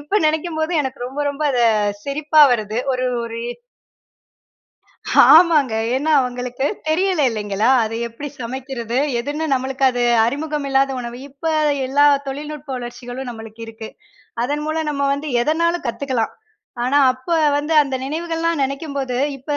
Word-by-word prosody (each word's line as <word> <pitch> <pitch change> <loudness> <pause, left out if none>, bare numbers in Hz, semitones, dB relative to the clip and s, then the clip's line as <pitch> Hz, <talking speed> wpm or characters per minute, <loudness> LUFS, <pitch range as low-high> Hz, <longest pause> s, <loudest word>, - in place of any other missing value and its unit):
இப்போ 295 +8 -1
நினைக்கும்போது 315 +1 -1
எனக்கு 265 -1 -6
ரொம்ப 270 +3 -5
ரொம்ப 285 +2 -6
அத 250 - +1 0.4
சிரிப்பா 300 +2 +3
வருது. 215 -1 -2 0.2
ஒரு, 255 0 -1 0.2
ஒரு 230 0 -6 1.9
ஆமாங்க. 310 -7 +5 0.2
ஏன்னா, 295 +4 -1
அவங்களுக்கு 250 +1 -3 0.2
தெரியல 365 +2 +1
இல்லங்களா, 210 0 -1 0.2
அத 220 - -4
எப்படி 285 +6 -7
சமைக்குறது? 245 -1 -4 0.2
எதுன்னு 290 +5 -3
நம்பளுக்கு 265 +1 -2
அது 245 -1 -2 0.2
அறிமுகம் 295 +3 -3
இல்லாத 270 0 +2
உணவு. 240 0 -7
இப்ப 275 +4 -19 0.4
எல்லா 285 +2 +3 0.2
தொழில்நுட்ப 295 +1 -6
வளர்ச்சிகளும் 245 +1 -7
நம்பளுக்கு 225 -1 -10
இருக்கு. 225 0 -9 0.6
அதன் 290 +4 -2
மூலம் 315 0 -2
நம்ப 280 -1 -1
வந்து 290 +2 -5
எதனாலும் 335 +3 0
கத்துக்கலாம். 250 -2 -2 0.5
ஆனா, 275 +3 +3
அப்போ 260 +7 -3 0.2
வந்து 295 +2 -2
அந்த 275 -2 -4
நினைவுகள்லாம் 330 +2 -2
நெனைக்கும்போது 275 -2 -3 0.2
இப்போ 290 +3 -3
275 Hz, 130 wpm, -20 LUFS, 245-305 Hz, 1.9 s, ஆமாங்க